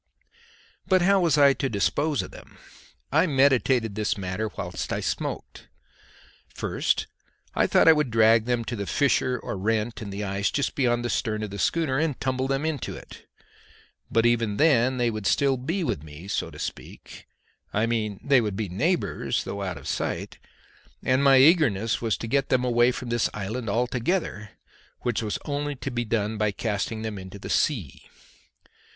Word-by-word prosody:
But 185 -2 +4
how 195 +1 +4
was 170 -4 +2
I 140 -1 +6
to 135 0 -2
dispose 140 +8 0
of - - -10
them? - - -14 0.5
I 160 +6 +4
meditated 130 -5 +3
this 105 0 -1
matter 100 +3 -3
whilst - - -4
I - - -1
smoked. - - -4 0.9
First - - 0 0.5
I - - +2
thought - - +4
I 160 - +10
would 150 -4 0
drag 110 0 +4
them 120 -1 -1
to 120 - -3
the 100 -3 -4
fissure 130 -2 +1
or - - -5
rent 110 +3 -1
in 105 - -6
the 100 +1 -4
ice 100 0 -1
just 140 - -1
beyond 120 -3 +1
the - - -1
stern 110 0 -1
of 105 - -5
the 100 - -6
schooner 150 -2 +1
and 155 -4 -1
tumble 130 0 -1
them 135 +2 -1
into 155 -5 -3
it. - - -13 0.8
But 115 0 +2
even 115 -3 +1
then 130 -5 +3
they 120 -1 +1
would 110 -3 -3
still 140 -1 +3
be 165 +9 -2
with 75 - -2
me, 75 +4 -11
so - - -2
to - - -12
speak - - -8 0.4
I 110 +2 +1
mean, 110 -4 -2
they 135 -3 +4
would 105 -3 -2
be 105 -2 -3
neighbours 165 - -1
though 100 - -5
out 90 -4 -3
of 70 - -10
sight; - - -3 0.6
and 130 +2 +2
my 135 -1 +6
eagerness 130 - +4
was 115 -2 0
to 115 - -6
get 135 +2 0
them 130 -1 +2
away 120 0 +4
from 125 -1 -6
this 120 -1 +1
island 110 +3 -4
altogether, 120 - -1 0.5
which 120 -2 -1
was 105 -2 -2
only 145 0 -2
to 135 +1 -5
be 120 0 -2
done 110 -1 -1
by 105 -1 +2
casting 110 +1 -3
them 110 -3 -4
into 95 +1 -9
the 100 - -7
sea. 105 - -1
120 Hz, 180 wpm, -25 LUFS, 105-135 Hz, 0.9 s, I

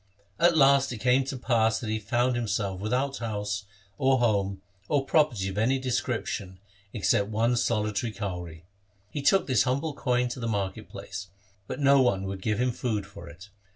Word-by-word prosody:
At 170 -1 +4
last 140 -1 +5
it 120 - -4
came 125 +4 +2
to 135 0 -4
pass 115 -3 +2
that 110 -3 -4
he 110 - -1
found 120 +4 0
himself 100 -5 -2
without 125 +7 -1
house, 105 -2 -3 0.3
or 130 0 +4
home, 100 -5 0 0.3
or 140 -2 +1
property 135 -11 +2
of 95 +1 -3
any 125 +5 +2
description 120 -7 -3 0.3
except 100 -2 +1
one 115 +3 +1
solitary 110 -2 0
kauri. 90 -6 -6 0.5
He 145 - -3
took 190 +8 +4
this 130 -4 +2
humble 140 +4 0
coin 125 -3 0
to 125 - -6
the 115 - -3
market 105 0 -3
place, 95 0 -7 0.4
but - - -5
no 140 -1 +5
one 100 -7 +2
would 95 0 -5
give 105 +1 -1
him 125 0 +2
food 110 -4 -2
for 100 -5 -11
it. 90 +8 -13
115 Hz, 180 wpm, -27 LUFS, 100-130 Hz, 0.5 s, last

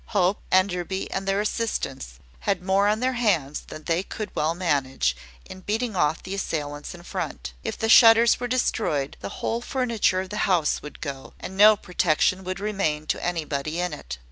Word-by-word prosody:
Hope, 185 +1 +2
Enderby, 185 0 +1
and 195 0 -3
their 195 +1 +1
assistants, 170 - -3 0.2
had 190 -3 -1
more 195 +2 +3
on 215 +2 +1
their 260 +1 +1
hands 180 - 0
than 155 - -9
they 165 +2 +1
could 210 +1 -7
well 155 +2 0
manage, 135 - 0 0.3
in 185 - -10
beating 220 +3 -2
off 155 -2 +1
the 190 - -5
assailants 150 -6 -4
in 175 - -13
front. 65 - -5
If - - -4
the 225 - -1
shutters 230 0 +7
were 245 - -2
destroyed, 220 - 0
the - - -6 0.2
whole 230 +1 0
furniture 235 -7 0
of 190 - -8
the 210 - -4
house 170 -5 +2
would 150 - -10
go, 140 -4 -6
and 190 - -7
no 210 +2 +8
protection 180 +1 +1
would 185 +1 -3
remain 195 -8 -1
to - - -2
anybody 155 -2 -2
in 180 -2 -1
it. 65 - -7
185 Hz, 185 wpm, -25 LUFS, 155-210 Hz, 0.3 s, no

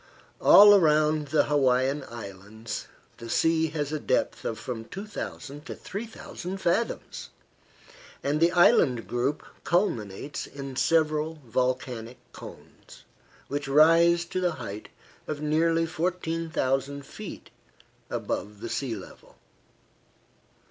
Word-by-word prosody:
All 205 0 +9
round 155 -2 +3
the 150 +1 +3
Hawaiian 135 0 +2
Islands 110 0 -7 0.3
the 115 0 -9
sea 160 +5 +2
has 150 -2 -3
a 155 - -2
depth - - -1
of - - -2
from 115 -3 -6
2,000 165 - -7
to - - -6
3,000 200 -3 -7
fathoms, 190 +5 -2 0.9
and 145 +2 0
the 170 +2 +4
island 175 - +4
group 130 +5 -1 0.2
culminates 140 - -1
in 140 -2 -8
several 155 +1 +1
volcanic 125 -1 -2 0.2
cones, - - -13 0.4
which 145 0 -3
rise 165 +4 +5
to 185 +2 -3
the 175 -2 +1
height 110 -7 -7 0.4
of 150 - -4
nearly 165 +2 +2
14,000 160 -5 -2
feet - - -9 0.6
above 105 0 -4
the - - -6
sea 130 -5 -2
level. 95 - -13
150 Hz, 110 wpm, -27 LUFS, 125-165 Hz, 0.9 s, All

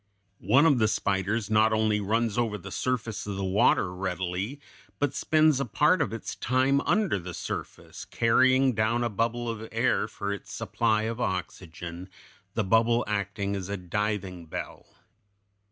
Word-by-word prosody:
One 140 +5 +6
of 145 -6 +4
the 110 - +4
spiders 100 +1 -1
not 110 +1 +4
only 110 -1 +1
runs 110 +2 0
over 115 -3 0
the 100 0 -10
surface 120 -5 -2
of 100 - -3
the 95 - -3
water 95 -1 +2
readily, 95 +6 -3 0.4
but 145 -2 0
spends 155 -3 +3
a 140 - 0
part 150 - +3
of - - 0
its 115 - -5
time 130 +2 +2
under 185 - +2
the 90 -1 -7
surface, - - -6
carrying 130 +3 +3
down 115 +2 +1
a 120 - 0
bubble 115 +3 -1
of 115 -1 -5
air - - +1
for 100 0 -4
its 100 - -9
supply 110 -2 0
of 115 +2 -3
oxygen, 90 -2 -5 0.5
the 110 - +1
bubble 115 +4 +3
acting 100 -1 -2
as 95 -1 -5
a 100 - -2
diving 95 -1 -3
bell. - - -7
110 Hz, 160 wpm, -27 LUFS, 100-120 Hz, 0.5 s, One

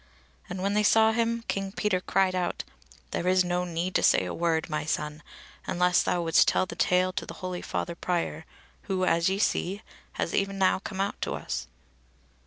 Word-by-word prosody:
And 185 +1 -4
when 200 +1 +1
they 210 - +3
saw 220 +1 +5
him 230 0 0
King 195 -1 -2
Peter 195 -2 0
cried 190 0 +2
out: 180 -1 -2 0.5
"There 175 - -2
is 185 0 +4
no 180 0 -1
need 175 +1 -3
to - - +2
say - - +4
a - - -4
word, 165 -2 0
my 155 -2 -2
son; 150 0 -3 0.5
unless 180 0 +3
thou 175 - 0
wouldst 165 -1 +4
tell - - +3
the - - -8
tale 185 0 +2
to - - -3
the - - -8
holy 185 -1 -5
father 170 - -3
Prior, 170 -2 -2 0.4
who, 185 -1 +1
as 170 +1 +3
ye 190 - 0
see, 200 0 0 0.3
has - - -2
e'en 195 0 0
now 190 -1 +3
come 195 -1 -7
out 200 - -2
to - - -2
us." - - -4
185 Hz, 195 wpm, -27 LUFS, 170-195 Hz, 0.5 s, saw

